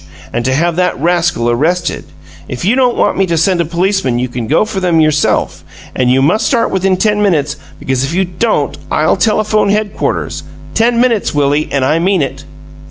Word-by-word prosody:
And 120 - -1
to 130 0 +1
have 170 +3 0
that 180 -6 0
rascal 170 -6 +1
arrested. 165 +9 -1 0.4
If 125 +6 -5
you 215 +6 +3
don't 250 -2 +2
want - - +1
me 195 - +2
to 170 -1 0
send 175 +2 +2
a - - -1
policeman 170 -6 0
you 125 +1 -2
can 120 -2 -5
go 215 - +2
for 215 -3 -4
them 175 -3 +1
yourself, 155 -1 +1 0.3
but 130 - +1
you 130 +2 +3
must 210 +10 +2
start 240 -4 +1
within 190 0 +1
ten 210 +1 +1
minutes, 150 -7 +1 0.2
because 130 -1 -2
if 135 - -2
you 190 +3 +1
don't 175 -6 -1
I'll 155 - +2
telephone 215 +1 +1
headquarters. 205 -7 -2 0.3
Ten 235 +1 +2
minutes, 235 -9 +1
Willie, 145 +1 +1
and 135 -2 0
I 155 +5 +1
mean 185 -2 +1
it!" 140 +1 -6
170 Hz, 195 wpm, -13 LUFS, 140-200 Hz, 0.4 s, you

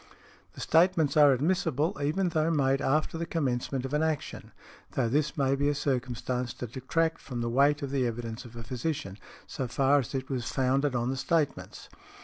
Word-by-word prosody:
The - - -9
statements 165 -4 +3
are 145 -2 +7
admissible 155 +1 +1
even 175 +6 +1
though 160 -1 +1
made 135 -3 +2
after 155 +3 0
the 170 - -3
commencement 135 -4 -1
of 135 - -5
an 150 - +2
action, 160 -2 -3 0.4
though 125 -3 +1
this 145 +6 0
may 135 -1 +2
be 145 +1 +1
a 145 - 0
circumstance 125 -2 -2
to - - -5
detract 160 +7 -1
from 120 -2 -5
the 115 - -1
weight 145 +4 +3
of 135 - -4
the 135 -3 +1
evidence 115 +1 -5
of 120 -2 -13
a 115 - -7
physician, 115 -5 -4 0.3
so 130 - -4
far 135 +3 +3
as 135 0 -4
it 130 0 -3
was 125 -3 -3
founded 135 +1 +1
on 120 +1 0
the 135 - -3
statements. 155 +2 -1
135 Hz, 190 wpm, -29 LUFS, 125-150 Hz, 0.4 s, are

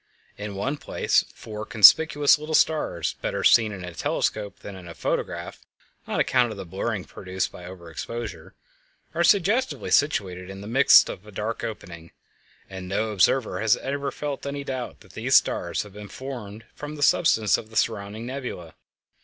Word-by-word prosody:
In 105 -1 -6
one 135 +9 -2
place - - +1
four 105 -1 -7
conspicuous 145 +7 +6
little 155 +1 -2
stars, 150 - +1
better - - -2
seen 110 -2 +5
in 95 -3 -7
a 90 - -8
telescope 105 +4 -2
than 100 - -8
in 90 -2 -11
the 85 - -9
photograph - - -3 0.5
on - - -2
account 120 - +3
of 110 - -7
the 95 - -6
blurring 95 +3 -3
produced 95 +2 -4
by 90 - -11
over 90 -2 -10
exposure, 95 +1 -7 0.6
are 170 +1 +1
suggestively 205 +8 +2
situated 95 -11 +1
in 95 0 -8
the - - -9
midst 130 +6 +6
of 100 - -8
a - - -11
dark 105 +3 -4
opening, 85 -6 -7 0.6
and 95 -1 -8
no 110 +4 -1
observer 110 +5 +2
has 110 -1 +3
ever 140 +1 -3
felt 145 -1 -5
any 140 0 -4
doubt 130 -3 -5
that - - -18
these - - +1
stars - - +2
have 105 -2 -14
been 105 0 -10
formed 115 -2 -8
from 150 +1 -7
the 145 - -3
substance 110 - +4
of 110 - -6
the 110 - -15
surrounding 110 0 -1
nebula. 125 - -6
110 Hz, 175 wpm, -25 LUFS, 95-135 Hz, 0.6 s, conspicuous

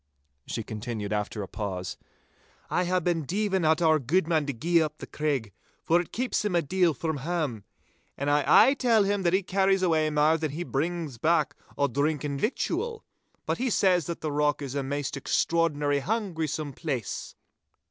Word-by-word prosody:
She 115 - -3
continued, 110 -1 -4
after 105 0 -2
a - - -7
pause,— 95 -4 -4 0.8
'I 180 - +1
hae 185 +1 +2
been 170 -2 0
deevin' 190 +3 0
at 160 +2 +3
our 155 -1 +4
guidman 155 +2 +1
to - - 0
gie 165 +8 +2
up 155 -1 -2
the - - -8
Craig, 140 -8 -2 0.3
for 170 +2 +3
it 175 - -10
keeps 245 -2 -1
him 205 -4 0
a 170 - +3
deal 175 0 +2
from 160 +2 -2
hame, 140 - -2 0.5
and 140 - -3
I 145 0 +3
aye 270 - +7
tell 235 -6 +3
him 200 0 0
that 175 -1 +1
he 190 +1 +3
carries 195 0 +2
awa' 160 -3 +2
mair 155 +2 +3
than 155 -3 -2
he 170 +3 -3
brings 160 -4 -3
back 155 -1 +2 0.2
o' 140 - +3
drink 145 +3 0
and 140 -2 -3
victual. 415 - -2 0.4
But - - -1
he 255 +1 0
says 180 -7 +3
that 170 - -5
the 155 - -2
rock 145 0 +1
is 135 -2 -5
a 140 - -1
maist 145 +1 -3
extraordinary 145 -1 +1
hungrysome 160 -7 -2
place! 130 - -4
155 Hz, 185 wpm, -27 LUFS, 140-180 Hz, 0.8 s, aye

